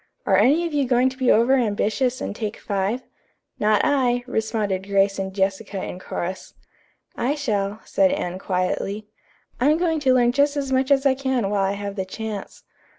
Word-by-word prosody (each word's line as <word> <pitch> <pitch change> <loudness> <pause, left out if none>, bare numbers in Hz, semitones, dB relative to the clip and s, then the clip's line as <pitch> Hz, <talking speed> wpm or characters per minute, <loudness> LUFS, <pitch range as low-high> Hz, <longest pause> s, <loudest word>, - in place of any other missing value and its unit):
Are - - +3
any 310 +7 +4
of 335 - -4
you 285 -3 +1
going 250 +1 +3
to 260 - -11
be 255 -1 +1
over 235 +4 +4
ambitious 245 +1 0
and - - -4
take 215 -1 -4
five?" 200 +5 -2 0.6
"Not 210 0 +3
I," 245 -3 +2
responded 215 -5 -2
Grace 195 0 +2
and 190 0 -3
Jessica 195 0 -2
in 180 - -6
chorus. 185 0 -5 0.6
"I 270 +5 0
shall," 210 -7 -2
said 290 -1 +3
Anne 185 -11 -3
quietly. 195 +3 -2 0.5
"I'm 295 +5 +3
going 330 -2 0
to 265 -3 +3
learn 240 -1 +4
just 285 +3 +2
as 275 -2 -2
much 260 +1 +1
as 275 0 +3
I 275 - +5
can 260 -6 -1
while 200 -1 +1
I 195 +1 +1
have 200 0 -5
the 190 - -2
chance." 210 +1 -7
225 Hz, 185 wpm, -23 LUFS, 200-265 Hz, 0.6 s, I